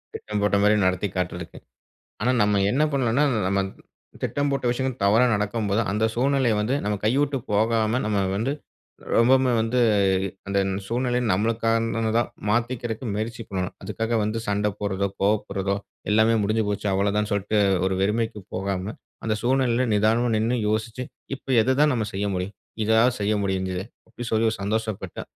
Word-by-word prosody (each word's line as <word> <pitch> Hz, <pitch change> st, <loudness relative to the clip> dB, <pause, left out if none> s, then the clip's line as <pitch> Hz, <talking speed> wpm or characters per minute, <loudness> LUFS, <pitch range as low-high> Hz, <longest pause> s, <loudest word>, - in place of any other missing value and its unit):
திட்டம் 105 Hz, -1 st, -4 dB
போட்டமாரி 105 Hz, +1 st, +3 dB
நடத்தி 95 Hz, +2 st, +1 dB
காட்டுறதுக்கு. 90 Hz, -2 st, -4 dB, 0.6 s
ஆனா 120 Hz, +4 st, +2 dB
நம்ம 105 Hz, -1 st, +2 dB
என்ன 135 Hz, +6 st, +1 dB
பண்ணோன்னா, 130 Hz, 0 st, +2 dB, 0.3 s
நம்ம 100 Hz, +1 st, +1 dB, 0.6 s
திட்டம் 145 Hz, 0 st, 0 dB
போட்ட 140 Hz, -2 st, -2 dB
விஷயங்கள் 130 Hz, 0 st, -2 dB
தவறா 110 Hz, +5 st, +5 dB
நடக்கும்போது, 105 Hz, 0 st, 0 dB
அந்த 105 Hz, +2 st, 0 dB
சூழ்நிலைய 130 Hz, -2 st, +2 dB
வந்து 110 Hz, +6 st, 0 dB
நம்ம 105 Hz, 0 st, 0 dB
கைவிட்டு 140 Hz, +5 st, +2 dB
போகாம 110 Hz, +2 st, +2 dB
நம்ம 105 Hz, -1 st, 0 dB, 0.2 s
வந்து 115 Hz, +7 st, 0 dB, 0.6 s
ரொம்பவுமே 130 Hz, +2 st, +4 dB
வந்து 115 Hz, +3 st, 0 dB, 0.7 s
அந்த 100 Hz, 0 st, 0 dB, 0.3 s
சூழ்நிலை 125 Hz, +2 st, 0 dB
நம்மளுக்கானதா 115 Hz, +2 st, +1 dB, 0.3 s
மாத்திக்கிறக்கு 120 Hz, +1 st, -1 dB
முயற்சி 115 Hz, +2 st, -3 dB
பண்ணணும். 95 Hz, -1 st, -3 dB
அதுக்காக 110 Hz, +4 st, -2 dB
வந்து 110 Hz, +2 st, -1 dB
சண்ட 105 Hz, +1 st, +1 dB
போடுறதோ, 100 Hz, -1 st, -1 dB
கோவப்படுறதோ, 100 Hz, -1 st, 0 dB, 0.4 s
எல்லாமே 110 Hz, +1 st, +4 dB
முடிஞ்சு 110 Hz, +2 st, +1 dB
போச்சு 105 Hz, 0 st, -2 dB
அவ்ளதான் 100 Hz, +2 st, +1 dB
சொல்ட்டு 100 Hz, +1 st, 0 dB, 0.3 s
ஒரு 95 Hz, -, 0 dB
வெறுமைக்கு 110 Hz, +1 st, -1 dB
போகாம 95 Hz, +2 st, -3 dB, 0.3 s
அந்த 110 Hz, -1 st, +1 dB
சூழ்நிலையில 130 Hz, 0 st, +2 dB
நிதானமா 110 Hz, +4 st, +2 dB
நின்னு 115 Hz, +3 st, +1 dB
யோசிச்சு, 110 Hz, +3 st, -2 dB, 0.3 s
இப்ப -, -, -28 dB, 0.2 s
எத 130 Hz, +3 st, +2 dB
தான் 150 Hz, 0 st, +5 dB
நம்ம 110 Hz, -3 st, -1 dB
செய்ய 100 Hz, +2 st, -2 dB
முடியும் 90 Hz, +2 st, -3 dB, 0.3 s
இதாவது 115 Hz, +3 st, +3 dB
செய்ய 105 Hz, +1 st, +1 dB
முடிஞ்சதே 95 Hz, -1 st, -2 dB, 0.2 s
அப்பிடி 120 Hz, +1 st, -7 dB
சொல்லி 110 Hz, 0 st, +3 dB
ஒரு 110 Hz, -, -4 dB
சந்தோஷப்பட்டு, 105 Hz, -2 st, -3 dB
110 Hz, 145 wpm, -24 LUFS, 100-120 Hz, 0.7 s, தவறா